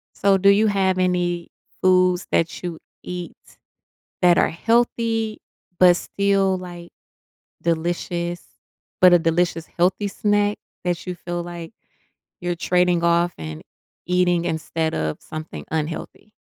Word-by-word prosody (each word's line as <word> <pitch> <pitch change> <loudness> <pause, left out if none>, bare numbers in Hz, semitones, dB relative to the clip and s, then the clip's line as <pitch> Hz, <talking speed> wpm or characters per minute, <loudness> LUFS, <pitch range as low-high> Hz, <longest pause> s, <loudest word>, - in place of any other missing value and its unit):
So, 200 -1 +3
do 195 +1 +4
you 205 +2 +5
have 190 -2 +1
any 175 -2 0 0.3
foods 185 -1 +3
that 165 - 0
you 175 -3 -5 0.2
eat 180 -1 -6 0.9
that 175 -1 +5
are - - +3
healthy 225 +2 0 0.4
but 180 -1 +7
still, 195 0 +1
like, 175 -1 -9 0.7
delicious 170 +1 -2 0.5
but 180 -1 +8
a - - +7
delicious 165 0 0
healthy 185 +4 0
snack 205 +1 +1 0.3
that 175 0 -2
you 180 - -3
feel 175 0 -5
like 170 0 -8 0.7
you're 175 0 -1
trading 180 0 +2
off 170 +1 +2
and 80 0 -7 0.4
eating 180 -1 +2
instead 160 -1 -2
of 80 -1 -2
something 155 0 -8
unhealthy? 160 +6 -4
175 Hz, 125 wpm, -22 LUFS, 170-190 Hz, 0.9 s, but